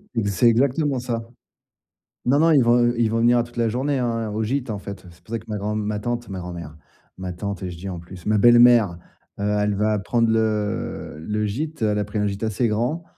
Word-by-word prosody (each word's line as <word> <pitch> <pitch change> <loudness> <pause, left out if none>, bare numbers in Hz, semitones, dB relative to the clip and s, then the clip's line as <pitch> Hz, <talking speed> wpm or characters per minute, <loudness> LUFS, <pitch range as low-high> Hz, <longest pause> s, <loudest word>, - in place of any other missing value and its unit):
Ex 100 -3 0
c'est 100 +6 +3
exactement 135 +4 +2
ça. 115 -2 -4 1.0
Non, 140 +4 +3
non, 165 +1 +5
ils 140 -4 +5
vont, 120 +1 +4
heu, 120 0 +2
ils 115 -2 +2
vont 115 - +1
venir 120 +1 +4
à 120 - +2
toute 120 0 -14
la 115 -1 +2
journée 135 +4 -1
hein, 115 -3 -1
au 110 +1 -2
gîte, 125 +3 -2
en 105 -2 -3
fait, 100 -2 -9
heu, - - -12
c'est 85 - -21
pour 110 - -16
ça 115 - -1
que - - -17
ma 105 -1 -3
grand-m 105 +1 -2
ma 105 0 -2
tante, 120 +2 -3
ma 95 - -5
grand-mère, 85 -4 -7 0.4
ma 95 -1 -5
tante 100 +2 -5
et 90 - -3
je 85 - -8
dis 95 +3 -6
en 90 -2 -5
plus, 85 +1 -12
ma 105 0 +2
belle-mère, 120 -5 +6 0.4
heu, - - -3 0.2
elle 105 0 +1
va 105 +1 +1
prendre 115 +3 +1
le 105 -7 -1
le 105 +6 -2
gîte. 150 +7 -4
Elle 105 -1 +1
a - - +1
pris 105 +1 -4
un 105 - +1
gîte 100 +1 -4
assez 110 +2 0
grand, 120 +10 -1
110 Hz, 250 wpm, -23 LUFS, 100-120 Hz, 1.0 s, belle-mère